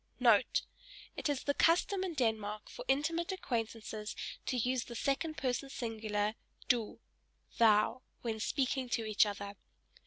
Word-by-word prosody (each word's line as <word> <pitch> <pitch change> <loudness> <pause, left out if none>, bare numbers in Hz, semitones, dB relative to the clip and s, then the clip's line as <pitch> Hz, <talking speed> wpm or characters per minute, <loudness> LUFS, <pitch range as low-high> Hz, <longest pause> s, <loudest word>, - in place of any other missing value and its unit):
* - - -38 1.0
It - - -2
is 285 -3 -1
the 285 - +1
custom 360 +5 +3
in 360 -4 -3
Denmark 215 -4 -1
for - - -7
intimate 330 +6 +1
acquaintances 225 - -3 0.3
to 255 - 0
use 250 +1 +1
the 235 - -8
second 295 +6 0
person 260 +1 -1
singular, 215 -4 -1 0.3
"Du," 235 -3 +1 0.6
(thou) 220 +2 +5 0.2
when 225 -2 -2
speaking 260 +2 0
to 230 -2 0
each 215 0 +4
other. 200 0 -5
240 Hz, 135 wpm, -34 LUFS, 215-275 Hz, 1.0 s, thou